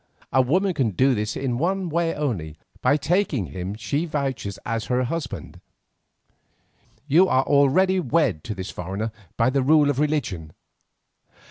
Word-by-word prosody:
A 130 - +5
woman 185 +9 +1
can 130 -8 +1
do 130 +7 +2
this 105 -1 -2
in 125 -3 -2
one 185 +3 0
way 170 0 0
only, 95 - -3 0.2
by 145 +4 +3
taking 165 - 0
him 95 +3 -5
she 140 +8 -2
vouches 135 - -3
as 115 0 -2
her 125 0 +1
husband. 160 +5 -5 1.4
You 165 +6 +5
are 130 - +3
already 145 +8 +3
wed 135 - +1
to 105 - -4
this 95 0 -6
foreigner 100 +5 -4 0.3
by 115 +3 +3
the 135 0 +1
rule 145 +1 +4
of 140 - -3
religion. 115 - -1
135 Hz, 150 wpm, -23 LUFS, 110-155 Hz, 1.4 s, A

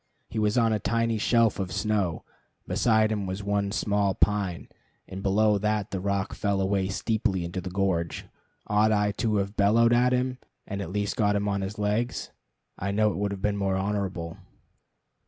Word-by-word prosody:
He 110 - -3
was 105 +2 +1
on 115 -2 +3
a 105 - 0
tiny 115 0 0
shelf 115 -1 +3
of 95 -2 -3
snow, 100 -7 -1 0.4
beside 110 -2 +2
him 105 -3 -2
was 95 +2 -4
one 100 0 0
small 100 -2 +1
pine, 100 -4 0 0.4
and 95 +1 -7
below 105 +1 +3
that 105 -1 -1
the 95 - -2
rock 100 0 -1
fell 100 -2 -1
away 95 0 +1
steeply 100 -2 -1
into 90 +2 -4
the 90 - -5
gorge. 90 -3 -1 0.4
Ought 105 +1 +3
I 105 -1 +2
to 110 -2 +1
have 100 +1 -1
bellowed 115 +4 +4
at 125 +1 +4
him, 125 0 0 0.3
and 100 -1 -4
at 85 - -5
least 100 +1 -1
have - - -18
got 105 -1 +3
him 100 0 0
on 100 -1 0
his 95 +2 -4
legs? 105 +4 -1 0.5
I 100 - -2
know 105 +1 +2
it - - -5
would 100 +1 0
have 100 0 -6
been 105 -1 +1
more 95 -1 0
honorable. 95 -3 -2
100 Hz, 190 wpm, -27 LUFS, 95-110 Hz, 0.5 s, bellowed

